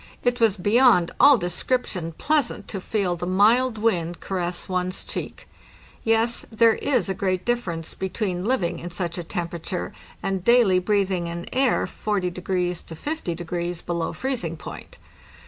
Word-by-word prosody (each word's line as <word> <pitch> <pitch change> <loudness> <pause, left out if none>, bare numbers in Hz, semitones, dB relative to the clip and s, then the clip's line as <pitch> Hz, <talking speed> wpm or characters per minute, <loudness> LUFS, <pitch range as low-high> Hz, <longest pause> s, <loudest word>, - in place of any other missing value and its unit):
It 245 0 +1
was 220 -3 +3
beyond 205 -2 +4
all 285 -2 +8
description 180 -2 -1
pleasant 295 - 0
to 195 - -4
feel 190 -3 0
the 175 +1 -4
mild 220 +6 +4
wind 175 -6 0
caress 180 -2 -3
one's 185 0 -1
cheek. - - -6 0.6
Yes, 225 +1 +2
there 225 0 +5
is 250 -7 0
a 190 - 0
great 185 -1 -1
difference 180 -10 -2
between 190 -1 -3
living 180 -8 0
in 175 - -6
such 175 0 -3
a - - -4
temperature 170 0 -4 0.3
and 190 -2 -1
daily 230 -5 +5
breathing 190 -3 0
an 170 0 -5
air 260 -1 +2
40° 195 -4 -2
to 180 -2 -2
50° 175 - -4
below 170 -1 -1
freezing 225 -12 -3
point. - - -10
185 Hz, 145 wpm, -24 LUFS, 175-225 Hz, 0.6 s, all